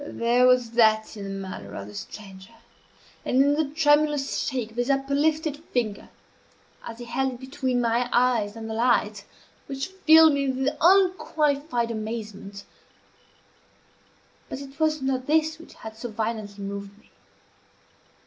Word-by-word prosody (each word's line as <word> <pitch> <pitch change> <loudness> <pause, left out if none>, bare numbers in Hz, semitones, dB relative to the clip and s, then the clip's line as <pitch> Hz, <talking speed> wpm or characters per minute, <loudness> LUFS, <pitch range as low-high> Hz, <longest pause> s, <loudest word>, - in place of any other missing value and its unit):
There 240 +2 +2
was 250 -2 +3
that 220 -2 +3
in 205 -2 -7
the - - -6 0.2
manner 185 - -8
of 100 - -6
the 105 - -11
stranger, 190 - -10 0.7
and - - -2
in 285 +1 +5
the 310 +1 +1
tremulous 295 -2 +2
shake 250 -6 -3
of 225 - -17
his 245 +2 -1
uplifted 290 +3 +1
finger, 220 -5 -3 0.7
as 230 - -8
he 240 - -8
held 265 +2 -1
it 245 - -11
between 260 -1 -2
my 235 +1 +1
eyes 235 -4 +2
and 225 -1 -7
the 220 - -4
light, 220 -3 +1 0.4
which 270 +2 -4
filled 320 -4 +6
me 280 -1 0
with 265 +2 -1
unqualified 310 -9 +2
amazement; 215 -3 -6 1.9
but - - -5
it 275 +1 -11
was 310 -2 +1
not 260 -1 -1
this 315 +1 +1
which 330 - -14
had 220 0 -10
so 235 +2 -6
violently 215 -2 -4
moved 200 0 -7
me. - - -25
250 Hz, 150 wpm, -25 LUFS, 220-285 Hz, 1.9 s, filled